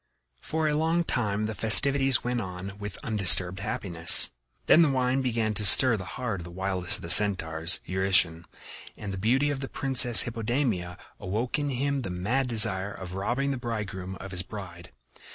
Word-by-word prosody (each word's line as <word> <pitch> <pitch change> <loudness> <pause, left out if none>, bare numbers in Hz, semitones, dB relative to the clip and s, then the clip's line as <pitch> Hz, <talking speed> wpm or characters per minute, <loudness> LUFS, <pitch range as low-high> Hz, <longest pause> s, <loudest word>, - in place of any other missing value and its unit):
For 155 - -3
a 150 - -1
long 165 +3 -1
time 105 -8 -3
the 110 - -5
festivities 135 +6 +3
went 125 -1 -3
on 95 +1 -9
with 105 -1 -8
undisturbed 95 -3 +1
happiness. 90 -5 +3 0.3
Then 170 - +4
the 160 - +2
wine 130 0 -1
began 115 -4 -3
to 105 - -3
stir 115 +5 +6
the 95 -2 -9
heart 120 -6 -5
of - - -9
the 85 - -11
wildest 95 0 -3
of - - -9
the 85 - -8
Centaurs, 85 -4 +4
Eurytion, 90 -3 0 0.5
and 100 -2 -8
the - - -7
beauty 130 +8 0
of 140 - -5
the 135 - -8
Princess 125 -5 +5
Hippodamia 115 -6 -4 0.2
awoke 110 +9 -4
in 145 -1 -3
him 140 +1 -3
the 100 - -7
mad 105 +10 -3
desire 100 -4 -1
of 90 -2 -10
robbing 120 +9 -3
the 135 - -4
bridegroom 105 -6 -7
of 95 0 -11
his 90 -1 -3
bride. 90 -3 -11
105 Hz, 180 wpm, -25 LUFS, 95-130 Hz, 0.5 s, stir